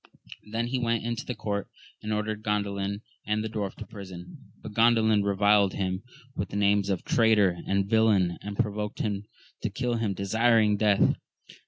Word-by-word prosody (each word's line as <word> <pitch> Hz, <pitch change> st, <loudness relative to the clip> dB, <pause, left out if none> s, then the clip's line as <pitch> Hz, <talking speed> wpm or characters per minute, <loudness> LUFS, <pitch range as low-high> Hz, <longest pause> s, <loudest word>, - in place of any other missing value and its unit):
Then 115 Hz, +1 st, -1 dB
he 125 Hz, +2 st, -1 dB
went 115 Hz, -2 st, 0 dB
into 115 Hz, 0 st, -3 dB
the 125 Hz, -, -3 dB
court, 100 Hz, -2 st, -3 dB, 0.3 s
and 105 Hz, -, -4 dB
ordered 105 Hz, 0 st, -2 dB
Grandalin 100 Hz, -1 st, -2 dB, 0.2 s
and 105 Hz, 0 st, -1 dB
the -, -, -2 dB
dwarf 105 Hz, -3 st, -4 dB
to -, -, -8 dB
prison; 95 Hz, -4 st, -11 dB
but 110 Hz, -, -9 dB
Gandalin 110 Hz, -2 st, +4 dB
reviled 100 Hz, 0 st, +3 dB
him 95 Hz, -1 st, -2 dB, 0.3 s
with 95 Hz, -, -3 dB
the -, -, -7 dB
names 100 Hz, -1 st, +2 dB
of 95 Hz, -3 st, -1 dB
traitor 105 Hz, -6 st, +3 dB
and 100 Hz, 0 st, +1 dB
villain, 105 Hz, -5 st, +3 dB
and 100 Hz, 0 st, -6 dB
provoked 105 Hz, -2 st, -2 dB
him 105 Hz, -1 st, -2 dB, 0.4 s
to -, -, -1 dB
kiU 125 Hz, -2 st, -1 dB
him, 105 Hz, -4 st, -1 dB
desiring 110 Hz, +2 st, +3 dB
death. 105 Hz, -1 st, +3 dB
105 Hz, 170 wpm, -27 LUFS, 100-110 Hz, 0.4 s, Gandalin